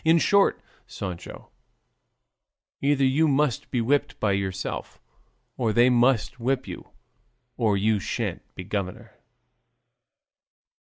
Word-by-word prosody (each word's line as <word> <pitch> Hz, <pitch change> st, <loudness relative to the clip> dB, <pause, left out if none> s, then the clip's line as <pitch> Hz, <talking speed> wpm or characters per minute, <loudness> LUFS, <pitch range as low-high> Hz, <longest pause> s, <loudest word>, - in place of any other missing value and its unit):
In 160 Hz, +1 st, +5 dB
short, 200 Hz, +4 st, +3 dB, 0.3 s
Sancho, 90 Hz, -4 st, -8 dB, 1.3 s
either 140 Hz, -1 st, +2 dB
you 145 Hz, +5 st, +3 dB
must 140 Hz, -3 st, +1 dB
be 125 Hz, -, 0 dB
whipped 140 Hz, +5 st, 0 dB
by 105 Hz, -, +1 dB
yourself, 95 Hz, -1 st, -3 dB, 0.6 s
or 115 Hz, -4 st, 0 dB
they 120 Hz, +2 st, +5 dB
must 125 Hz, +1 st, +2 dB
whip 130 Hz, +2 st, -1 dB
you, -, -, -8 dB, 0.7 s
or 110 Hz, -4 st, +1 dB
you 105 Hz, +1 st, +2 dB
shan't -, -, -3 dB
be 95 Hz, -, -6 dB
governor." 95 Hz, -1 st, -5 dB
120 Hz, 110 wpm, -25 LUFS, 100-140 Hz, 1.3 s, In